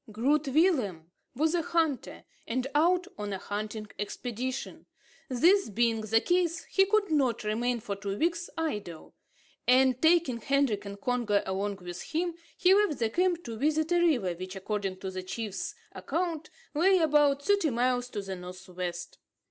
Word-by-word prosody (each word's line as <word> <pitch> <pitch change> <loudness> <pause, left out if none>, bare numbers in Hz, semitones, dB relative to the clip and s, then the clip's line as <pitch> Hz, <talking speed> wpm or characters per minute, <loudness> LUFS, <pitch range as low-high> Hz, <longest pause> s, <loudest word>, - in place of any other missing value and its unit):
Groot 280 +7 +1
Willem 255 - +1 0.2
was 315 +5 +1
a 345 - +2
hunter, 320 -5 -1 0.2
and 250 +2 -1
out 350 +4 +3
on 205 -1 -3
a 195 - -2
hunting 210 +2 -5
expedition. 245 +4 -4 0.4
This 345 - +4
being 225 +1 +1
the 220 +1 +3
case, 345 +3 +1
he 385 0 +2
could 405 -3 +2
not 270 -8 +1
remain 235 +3 -1
for 205 -3 -4
two 200 0 -4
weeks 340 +3 0
idle; 210 - -4 0.5
and 255 0 +4
taking 320 -7 +3
Hendrik 270 -6 +1
and 200 0 -7
Congo 235 -3 +1
along 200 +2 -2
with 175 0 -6
him, 345 +2 -2 0.2
he 370 0 +5
left 405 -8 +3
the 225 -2 0
camp 350 +2 +1
to 230 -1 -6
visit 310 +5 +1
a 350 - +4
river, 250 - +2
which, 185 +2 -7
according 195 -1 -3
to 190 - -4
the 185 0 -4
chief's 205 +2 -5 0.2
account, 330 -3 -3 0.2
lay 370 +6 +4
about 295 -4 +3
thirty 400 -4 +3
miles 245 0 0
to 205 -4 -4
the 195 -1 -5
north 180 +1 -10
west. 175 -1 -5
250 Hz, 165 wpm, -29 LUFS, 205-325 Hz, 0.5 s, he